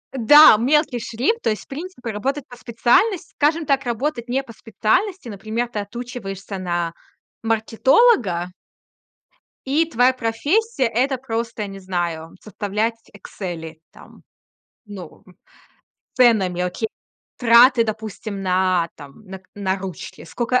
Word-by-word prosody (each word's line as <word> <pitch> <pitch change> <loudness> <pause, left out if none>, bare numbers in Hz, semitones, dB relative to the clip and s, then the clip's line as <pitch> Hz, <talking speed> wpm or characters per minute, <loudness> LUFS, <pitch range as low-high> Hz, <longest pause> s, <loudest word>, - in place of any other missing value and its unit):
Да, 265 +1 +8
мелкий 265 +2 +1
шрифт, 250 - -1
то - - 0
есть, 215 - -2
в - - -26
принципе, 275 -5 -7
работать 265 +7 -3
по 245 - -12
специальности 250 - +1
скажем 310 +2 +1
так, 275 -1 +1
работать 240 +1 -2
не 265 +2 0
по 235 -4 -12
специальности. 255 - -1
Например, 220 +3 -3
ты 220 - -5
отучиваешься 205 -3 -7
на 175 -2 -2 0.5
маркетолога 225 - +2 1.1
и 305 +5 +2
твоя 250 -1 +3
профессия- 285 - 0
это 260 +3 +1
просто, 230 -3 -4
я 205 - -5
не 195 0 -9
знаю, 175 -3 -4
составлять 215 +2 -2 0.2
"Эксели", 170 -5 -8
там, - - -17 0.6
ну, 195 -6 -11
м, 180 - -19 0.8
с - - -46
ценами, 210 -8 +3
окей, 180 +5 -2 0.5
траты, 240 +1 +6
допустим, 215 -2 -5
на, 185 -2 +1
там, 145 +6 -14
на 190 -1 -9
к 185 - -31
на 195 -2 -1
ручки. 190 -3 -8
Скока 245 +7 0
225 Hz, 135 wpm, -21 LUFS, 195-260 Hz, 1.1 s, Да